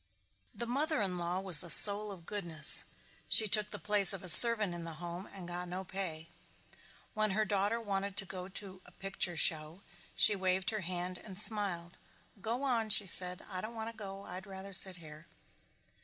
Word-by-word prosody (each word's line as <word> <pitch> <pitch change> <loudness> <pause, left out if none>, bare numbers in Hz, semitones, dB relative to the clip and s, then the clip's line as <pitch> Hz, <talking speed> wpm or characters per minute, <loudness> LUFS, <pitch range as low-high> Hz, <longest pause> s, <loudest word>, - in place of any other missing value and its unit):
The 235 - -3
mother 290 +5 -4
in 185 -4 -5
law 175 +2 -6
was 185 -5 +2
the 175 - -6
soul 205 +3 +4
of 180 -4 -15
goodness. 170 -7 +3 0.4
She 220 - +4
took 210 0 +1
the 205 - -10
place 205 +1 +1
of 190 - -10
a 180 - -4
servant 215 +1 +10
in 170 -1 -9
the 165 -1 -10
home 175 +3 -11
and 185 -3 -12
got 175 0 -9
no 180 +2 -8
pay. 175 -4 -9 0.9
When 215 -1 -3
her 215 - -2
daughter 205 +3 -4
wanted 200 -2 -7
to 195 - -1
go 185 -1 -10
to 190 -1 -9
a - - -19
picture 195 -3 -4
show 160 +3 -2 0.3
she 210 - +1
waved 185 0 -4
her 215 -1 -7
hand 180 0 -8
and 190 -3 -12
smiled. 200 -5 0 0.4
"Go 235 +6 -6
on," 235 -5 -4
she 205 -1 +2
said. 180 0 -2
"I 185 -2 -8
don't 225 +3 -11
want 225 0 -9
to - - -25
go. 195 -2 -12
I'd 190 +3 -11
rather 195 0 -12
sit 190 0 +2
here." 155 -2 -16
190 Hz, 195 wpm, -29 LUFS, 175-210 Hz, 0.9 s, servant